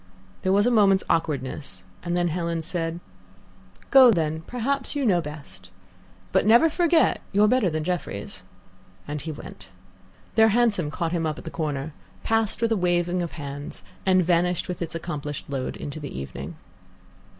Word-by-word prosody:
There 185 - +1
was 200 +2 +4
a 245 - +3
moment's 200 -4 +4
awkwardness, 135 - -2 0.2
and 175 0 -1
then 175 -1 +2
Helen 170 0 -2
said: 165 0 -3 0.9
"Go, 265 -2 +9
then; 160 -6 +1
perhaps 260 +3 -2
you 285 -2 0
know 180 -6 +3
best; 150 - -9 0.6
but - - +3
never 235 +10 +6
forget 340 -1 +3
you're 210 +1 +4
better 240 -4 +3
than 155 -1 -2
Jefferies." 170 - -3 0.7
And 150 0 -3
he 160 +3 -4
went. 95 -10 -10 0.6
Their 220 0 +6
hansom 215 -8 +2
caught 165 +2 -2
him 165 -2 0
up 155 0 -3
at - - -9
the - - -7
corner, 150 -2 -3 0.3
passed 225 0 0
with 230 - +2
a - - +4
waving 175 0 +1
of 170 - -4
hands, 145 -1 -7 0.2
and 185 -2 +3
vanished 175 0 +1
with 180 - -5
its 165 -1 -4
accomplished 150 -4 -5
load 135 -2 -3
into 145 +2 -6
the 145 -2 -7
evening. 70 -2 -7
175 Hz, 165 wpm, -25 LUFS, 150-210 Hz, 0.9 s, Go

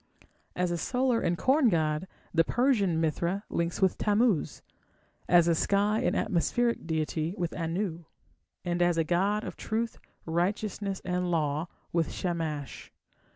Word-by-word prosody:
As 180 -1 0
a 170 - -1
solar 250 +1 +1
and 175 - 0
corn 265 - +4
god, 155 -1 0 0.3
the 165 -1 +5
Persian 205 -6 +2
Mithra 170 +5 0
links 170 +3 -1
with 190 - +2
Tammuz, 210 -4 +1 0.7
as 175 -1 +6
a 170 - +4
sky 200 +5 +2
and - - +1
atmospheric 235 +5 0
deity 160 +1 -1
with 175 -3 -2
Anu, 170 0 -3 0.6
and 175 0 -1
as 175 -1 +3
a 165 - +3
god 195 +6 +1
of - - -7
truth, 230 +1 -2 0.3
righteousness, 195 +3 -1
and 180 0 -1
law 155 -1 0 0.3
with 165 -2 +1
Shamash. 160 -5 -4
175 Hz, 140 wpm, -29 LUFS, 165-205 Hz, 0.7 s, as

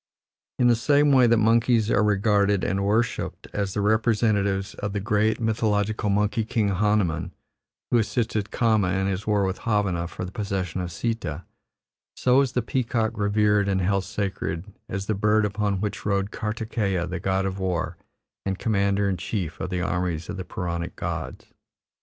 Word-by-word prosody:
In 125 - +2
the 120 -1 +6
same 145 +5 +3
way 130 -3 +6
that 115 0 +4
monkeys 115 0 +3
are 105 - +3
regarded 100 -1 +2
and 100 +1 0
worshipped 110 +4 -1
as 100 -2 -2
the 105 - 0
representatives 105 -2 +1
of 100 -1 -4
the 100 - -1
great 110 +2 +1
mythological 110 -1 0
monkey 105 +2 +1
king 110 -1 0
Hanumiin, 100 -4 +1 0.6
who 120 - +5
assisted 110 -2 -1
Kama, 110 -6 +2
in 95 0 0
his 100 +2 -2
war 105 -2 +2
with 95 0 -2
Havana 100 -6 0
for 90 - -6
the 90 - -8
possession 95 -4 -3
of 90 -1 -4
Sita, 90 -5 -3 0.7
so 130 +2 +4
is 135 -3 -1
the 125 - 0
peacock 115 -2 0
revered 105 0 +2
and 95 -1 +1
held 95 +1 +1
sacred 95 -4 -3 0.2
as 95 +1 -3
the 110 - 0
bird 105 +1 +2
upon 100 -1 -1
which 105 -1 -3
rode 100 0 0
Kartikeya 105 -4 -2
the 90 +1 -4
god 95 +1 0
of 95 0 -3
war 90 -3 -1 0.5
and 95 -1 -2
commander 100 -2 +1
in 95 -2 0
chief 90 -2 -4
of - - -3
the 90 -1 -2
armies 90 -3 -2
of 100 - -3
the 95 - -4
Puranic 85 -1 -4
gods. - - -5
100 Hz, 170 wpm, -25 LUFS, 95-110 Hz, 0.7 s, the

